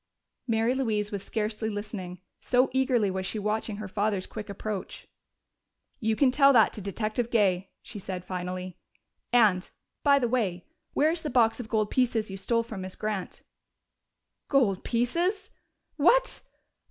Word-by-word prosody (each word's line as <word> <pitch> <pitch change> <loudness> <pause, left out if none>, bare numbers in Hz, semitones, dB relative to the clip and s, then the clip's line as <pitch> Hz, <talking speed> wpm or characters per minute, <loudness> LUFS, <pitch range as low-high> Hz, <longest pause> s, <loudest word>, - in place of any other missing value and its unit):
Mary 225 +1 +2
Louise 215 -6 -1
was 200 -2 -3
scarcely 215 +1 -2
listening, 205 -4 -6 0.2
so 255 +1 +2
eagerly 255 -6 +2
was 190 0 -3
she 190 - -3
watching 215 +1 -1
her 215 -1 -6
father's 200 -1 -1
quick 215 -1 -8
approach. 200 0 -5 0.9
"You 220 -1 +1
can 260 +2 +4
tell 275 +1 +6
that 225 -4 +5
to 210 - -6
Detective 215 +4 -2
Gay," 195 -5 +2
she 210 - -8
said 185 -1 -5
finally. 185 0 -5 0.5
"And, 210 -6 +4 0.3
by 280 -1 +5
the 250 -3 +1
way, 205 -8 -1 0.3
where 305 +2 +3
is 335 0 -2
the 305 - -3
box 235 -3 +3
of 230 -3 -6
gold 215 -2 0
pieces 230 -5 +1
you 195 - -5
stole 230 +4 +1
from 220 -4 -7
Miss 185 0 -6
Grant?" 210 -3 -4 1.0
"Gold 235 -10 +2
pieces? 335 - 0 0.5
What? - - +3
215 Hz, 155 wpm, -28 LUFS, 195-245 Hz, 1.0 s, tell